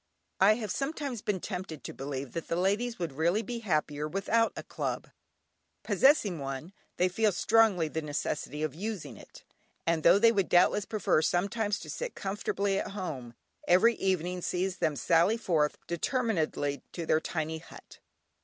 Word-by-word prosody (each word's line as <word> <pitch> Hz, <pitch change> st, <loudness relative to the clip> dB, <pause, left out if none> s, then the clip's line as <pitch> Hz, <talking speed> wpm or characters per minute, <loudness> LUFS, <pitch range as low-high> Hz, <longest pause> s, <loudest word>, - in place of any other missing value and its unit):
I 205 Hz, +3 st, +6 dB
have 215 Hz, -4 st, -4 dB
sometimes 275 Hz, -3 st, -3 dB
been 205 Hz, -3 st, -1 dB
tempted 180 Hz, -5 st, -6 dB
to -, -, -6 dB
believe 135 Hz, -1 st, -5 dB
that 165 Hz, -, -4 dB
the -, -, -1 dB
ladies 205 Hz, +7 st, 0 dB
would 170 Hz, -4 st, -3 dB
really 170 Hz, +9 st, +1 dB
be 240 Hz, 0 st, -4 dB
happier 150 Hz, -7 st, -1 dB
without 205 Hz, +7 st, +1 dB
a -, -, -6 dB
club; -, -, -4 dB, 0.7 s
possessing 220 Hz, -, +3 dB
one, 135 Hz, +6 st, -5 dB, 0.2 s
they 180 Hz, -, +3 dB
feel 210 Hz, +4 st, +2 dB
strongly 195 Hz, -3 st, +3 dB
the 160 Hz, +1 st, -3 dB
necessity 150 Hz, 0 st, -3 dB
of 155 Hz, -4 st, -1 dB
using 175 Hz, -, -5 dB
it, -, -, -14 dB, 0.4 s
and 165 Hz, -1 st, +1 dB
though 170 Hz, -, +6 dB
they 230 Hz, +2 st, +6 dB
would 195 Hz, -5 st, 0 dB
doubtless 180 Hz, +3 st, +4 dB
prefer 205 Hz, -7 st, +1 dB
sometimes 200 Hz, +5 st, 0 dB
to -, -, -9 dB
sit -, -, -5 dB
comfortably 195 Hz, 0 st, -1 dB
at -, -, -5 dB
home, 135 Hz, -, -5 dB, 0.3 s
every 185 Hz, +7 st, +6 dB
evening 180 Hz, -1 st, -1 dB
sees 185 Hz, +1 st, -1 dB
them 160 Hz, -4 st, 0 dB
sally 170 Hz, -, +3 dB
forth 155 Hz, -9 st, +1 dB
determinedly 170 Hz, -, -1 dB
to 170 Hz, -, -4 dB
their 155 Hz, -, +3 dB
tiny 160 Hz, -1 st, -3 dB
hut. 165 Hz, -, -14 dB
180 Hz, 165 wpm, -30 LUFS, 155-210 Hz, 0.7 s, I